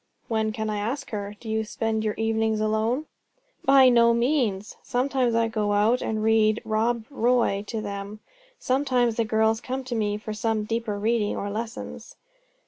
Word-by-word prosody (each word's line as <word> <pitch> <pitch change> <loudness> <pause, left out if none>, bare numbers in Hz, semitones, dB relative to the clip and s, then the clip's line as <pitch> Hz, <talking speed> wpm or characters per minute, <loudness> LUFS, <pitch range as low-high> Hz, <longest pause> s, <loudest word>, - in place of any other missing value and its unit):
"When 220 -2 0
can 220 0 -3
I 210 -1 -2
ask 235 +8 -3
her? 205 -1 -4
Do 230 - -11
you 220 0 0
spend 220 0 -2
your 215 -1 -1
evenings 225 -1 0
alone?" 220 +6 0 0.6
"By 270 -1 +7
no 235 -1 +5
means! 235 -6 0
Sometimes 250 -1 0
I 230 0 +2
go 215 -2 -1
out 215 +5 +3
and 215 -1 -2
read 220 0 +3
'Rob 225 +1 0
Roy' 240 -6 +1
to 225 -2 -3
them. 200 0 -6 0.4
Sometimes 255 -3 +1
the 230 - +1
girls 220 +1 +2
come 260 +1 -4
to 255 -1 -5
me 210 -2 0
for 215 0 -6
some 215 0 -1
deeper 225 -1 -2
reading, 215 0 0
or 200 0 -3
lessons." 225 +2 -6
220 Hz, 170 wpm, -25 LUFS, 215-235 Hz, 0.6 s, By